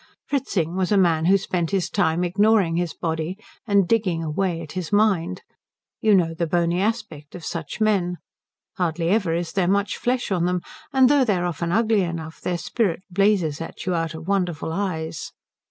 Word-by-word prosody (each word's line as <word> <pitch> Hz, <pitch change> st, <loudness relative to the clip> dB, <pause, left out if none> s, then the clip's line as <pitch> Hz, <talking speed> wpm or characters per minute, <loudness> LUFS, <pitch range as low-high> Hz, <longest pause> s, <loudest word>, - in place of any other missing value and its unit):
Fritzing 195 Hz, -, -1 dB
was 185 Hz, 0 st, 0 dB
a 205 Hz, -, +4 dB
man 165 Hz, -4 st, +3 dB
who 195 Hz, +3 st, +5 dB
spent 180 Hz, -3 st, -2 dB
his 195 Hz, -3 st, 0 dB
time 175 Hz, -3 st, +1 dB
ignoring 195 Hz, -1 st, +3 dB
his 175 Hz, -1 st, -1 dB
body 165 Hz, +2 st, -3 dB, 0.3 s
and 200 Hz, -3 st, +3 dB
digging 185 Hz, -7 st, +1 dB
away 165 Hz, +2 st, -1 dB
at 155 Hz, -3 st, -8 dB
his 180 Hz, -4 st, -5 dB
mind. 190 Hz, -4 st, +2 dB, 0.6 s
You 215 Hz, -2 st, +4 dB
know 165 Hz, -3 st, +2 dB
the 165 Hz, +1 st, -2 dB
bony 170 Hz, +2 st, +1 dB
aspect 200 Hz, -9 st, -3 dB
of 175 Hz, -, -8 dB
such 165 Hz, +2 st, -5 dB
men. 195 Hz, -5 st, +1 dB, 0.6 s
Hardly 170 Hz, -1 st, 0 dB
ever 190 Hz, -5 st, +2 dB
is 170 Hz, -1 st, -2 dB
there 185 Hz, -3 st, +1 dB
much 200 Hz, +1 st, +1 dB
flesh 245 Hz, -3 st, -1 dB
on 175 Hz, -2 st, +1 dB
them; 180 Hz, 0 st, 0 dB, 0.3 s
and 265 Hz, -1 st, +5 dB
though 285 Hz, 0 st, +4 dB
they 215 Hz, -6 st, +2 dB
are 175 Hz, 0 st, -1 dB
often 170 Hz, -1 st, -2 dB
ugly 220 Hz, +1 st, +3 dB
enough, 165 Hz, -3 st, -5 dB
their 180 Hz, -1 st, -1 dB
spirit 185 Hz, -1 st, -1 dB
blazes 180 Hz, -6 st, +2 dB
at 165 Hz, -, -7 dB
you 185 Hz, -, 0 dB
out 165 Hz, -1 st, -1 dB
of 160 Hz, +2 st, -9 dB
wonderful 180 Hz, -5 st, -1 dB
eyes. 165 Hz, -5 st, -3 dB
180 Hz, 185 wpm, -23 LUFS, 165-200 Hz, 0.6 s, who